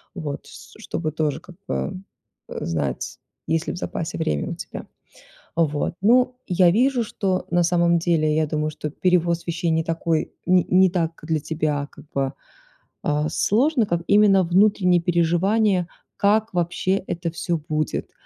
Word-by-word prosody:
вот, 150 -6 -5
с - - -13
ш - - -17
чтобы 155 -2 -3
тоже, 155 -1 -1
как 180 -2 -15
бы, 185 0 -3 0.5
э, - - -5
знать, 75 -5 -3 0.3
есть 160 +1 0
ли - - -2
в - - -7
запасе 165 -2 -4
время 75 - -1
у - - -4
тебя. - - -8 0.7
Вот, 150 -2 0
ну, 250 +4 +4
я 180 -1 +4
вижу, 250 +3 +2
что, 190 -3 -2
э, - - -3
на 175 - +4
самом 170 0 +3
деле, 160 -3 +2
я 155 0 +2
думаю, 155 0 -1
что 150 0 -5
перевоз 170 +1 +1
вещей 170 0 -1
не 160 0 +1
такой, 165 -1 -1
не 180 -1 +4
не 185 0 +5
так 165 -2 -2
для 160 0 0
тебя, 150 -2 -2
как - - -15
бы, 135 -1 0 0.7
а, 150 +1 0
сложно, 250 +3 +2
как 170 -3 -1
именно 200 -2 +5
внутренние 180 0 +3
переживания, 175 +3 +2 0.3
как 215 +2 +2
вообще 180 +2 0
это 170 0 -3
всё 170 +1 -2
будет. 155 0 -3
170 Hz, 165 wpm, -23 LUFS, 155-190 Hz, 0.7 s, не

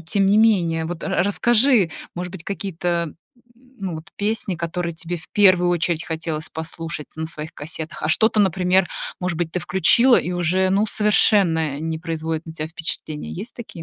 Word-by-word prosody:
тем 195 +5 +1
не 205 - +4
менее. 175 -8 +3
Вот 170 0 -5
ра 190 -2 +1
расскажи, 225 0 +3 0.2
может 180 +1 -4
быть, 175 -3 -9
какие-то, 175 -4 -2 0.4
м, 255 +1 -25
ну 190 -4 -4
вот 155 +1 -9
песни, 205 -2 -1
которые 170 0 -3
тебе 175 +1 -4
в 170 - -11
первую 185 -3 +5
очередь 170 -1 0
хотелось 160 -2 -4
послушать 160 -1 -5
на 160 0 -3
своих 155 -1 -8
кассетах, 160 +2 -7
а 155 - 0
что-то, 220 +4 +3
например, 185 -1 +3 0.3
может 180 -3 -2
быть, 170 -2 -1
ты 180 - -2
включила 190 +9 +4
и 180 - -1
уже, 180 +2 +1
ну, 195 +3 +2
совершенно 185 -8 +3
не 160 0 -3
производит 160 -1 -3
на 160 - -8
тя 155 -1 -4
впечатление. 160 -2 -3
Есть 215 +7 -7
такие 210 -8 -9
175 Hz, 180 wpm, -22 LUFS, 160-195 Hz, 0.4 s, первую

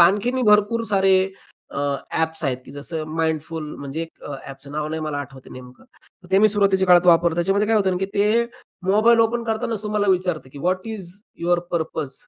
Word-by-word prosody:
आणखीनही 210 +9 +3
भरपूर 210 +1 +3
सारे 195 -3 +3 0.5
अ, - - -5 0.4
ॲप्स 160 0 0
आहेत 130 -3 0
की - - -13
जसं 150 +3 -5 0.2
Mindful 160 0 -1 0.2
म्हणजे 145 +4 -5 0.2
अ, 145 - -6
ॲपचं 135 +1 -10
नाव 150 0 -2
नाही 160 +1 -4
मला 150 -2 -3
आठवतंय 135 -2 -9
नेमकं, 125 - -12 0.5
ते 190 - +5
मी 215 +2 +6
सुरुवातीच्या 195 -2 +3
काळात 180 0 +6
वापरलं. 170 -1 +5
त्याच्यामध्ये 195 +5 +1
काय 225 - +3
होतं 190 -3 +1
की 195 - -1
ते 210 +3 +3 0.4
मोबाईल 215 +4 +4
ओपन 230 +1 +1
करतांनाच 220 -1 -2
तुम्हाला 210 -1 -1
विचारतं 180 -6 -1
की, 145 - -10
"व्हॉट 185 +6 -1
इज 200 -6 -5 0.3
युवर 175 +1 +2
पर्पज?" 160 -4 -3
180 Hz, 180 wpm, -22 LUFS, 160-210 Hz, 0.5 s, मी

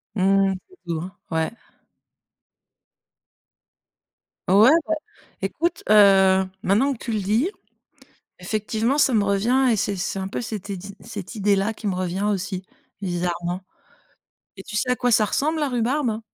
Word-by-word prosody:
Mmh 190 - -1 0.3
mh, - - -2
c'est 370 - -19
doux, 170 +1 -3 0.2
ouais. 160 +2 0 3.0
Ouais 205 +8 +7 0.2
bah, 320 - +1 0.5
écoute, 330 - -2
heu, 190 -2 +6 0.2
maintenant 255 +9 +2
que - - -9
tu 235 - -5
le 215 - 0
dis, 220 - +1 0.9
effectivement 215 +7 -1
ça 275 -3 +3
me 210 -3 +3
revient 235 +7 +2
et 220 - +2
c'est 200 0 -1
c'est 190 +1 -3
un 190 - -3
peu - - -4
cette 215 -3 -6
idée 195 0 -6
cette 200 +2 -8
idée 205 -1 +2
là 210 +3 0
qui 215 - -4
me 190 - -1
revient 185 +1 -2
aussi, 190 -1 -3 0.4
bizarrement, 175 0 -2 1.0
et 190 - -9
tu 210 - -7
sais 250 +3 0
à - - +4
quoi 245 -1 +1
ça 220 -1 +4
ressemble 310 +9 0
la 290 - +1
rhubarbe? 240 -1 0
205 Hz, 155 wpm, -23 LUFS, 190-235 Hz, 3.0 s, Ouais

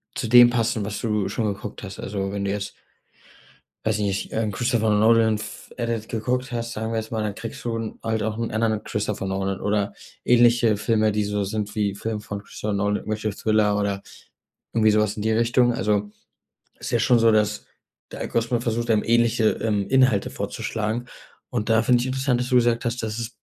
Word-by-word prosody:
zu 120 - -2
dem 120 +1 +8
passen, 115 -3 0
was 105 0 -4
du 105 -4 0
schon 105 -1 -1
geguckt 100 +1 -8
hast. 95 -2 -8
Also, 95 -1 -3
wenn 100 0 -3
du 100 - 0
jetzt 100 0 -4 1.1
weiß 110 -1 +1
ich 105 - 0
nicht, 100 -1 -2
äh, - - 0
'n 110 - -1
Christopher 115 +1 +1
Nolan 110 +1 +4
F 110 +1 -9
Edit 115 -2 -3
geguckt 125 +3 -2
hast, 115 -1 -3
sagen 110 0 -3
wir 115 - 0
jetzt 110 +1 -5
mal, 110 -1 -1
dann 105 -2 -2
kriegst 115 - -7
du 115 -1 -2
'n 115 -1 -5
halt 110 -1 -1
auch 110 0 -2
'n 115 0 -3
anderen 110 -1 0
Christopher 105 -2 -3
Nolan 95 0 -2
oder 105 -1 0 0.3
ähnliche 120 -2 +4
Filme, 110 0 +1
die 105 0 0
so 105 0 -1
sind 105 +1 -3
wie 100 -2 0
Film 110 +1 -4
von 100 -1 -6
Christopher 105 +1 -5
Nolan, 105 +1 +1
irgendwelche 110 0 -3
Thriller 105 0 +1
oder 100 -1 -1 0.7
irgendwie 110 -1 +4
so 105 - +3
was 105 0 0
in 105 - -4
die 110 +1 +1
Richtung. 120 +2 +3
Also, 105 -1 0 0.7
ist - - -5
ja 120 - +2
schon 120 +1 +4
so, 115 0 +5
dass 105 0 +1 0.5
der - - -7
Algorithmus 115 +1 -1
versucht 115 0 -1
einem, 110 -2 +3
ähnliche, 115 -1 +3
ähm, 105 -3 0
Inhalte 130 -6 +3
vorzuschlagen. 110 +3 -3 0.4
Und 115 -3 -2
da 115 0 +4
finde 125 0 +4
ich 125 - -2
interessant, 130 -1 0
dass 125 0 -2
du 125 - +2
gesagt 120 0 +3
hast, 120 0 -2
dass 110 +1 -3
es 115 +1 -5
110 Hz, 210 wpm, -24 LUFS, 105-115 Hz, 1.1 s, dem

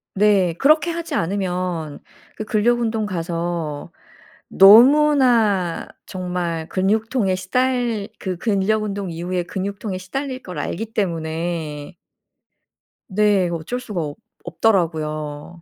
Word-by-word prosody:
네. 195 -4 +3
그렇게 310 +4 +4
하지 335 0 -4
않으면 180 -4 -2 0.4
그 215 - -5
근력 230 +3 +1
운동 220 -2 -1
가서 170 -4 -4 0.6
너무나 230 - +5 0.2
정말 180 -3 -4
근육통에 210 +2 0
시달 235 +2 -1
그 185 -2 -4
근력 215 +2 0
운동 200 -3 -4
이후에 175 +2 -3
근육통에 200 +2 -4
시달릴 260 +8 -5
걸 180 - -8
알기 225 +4 -4
때문에 165 -4 -3 1.1
네. 200 -2 +2
어쩔 170 +9 -4
수가 210 -8 -4
없 145 -2 -5 0.3
없더라고요. 160 -4 -1
190 Hz, 225 characters per minute, -21 LUFS, 170-220 Hz, 1.1 s, 너무나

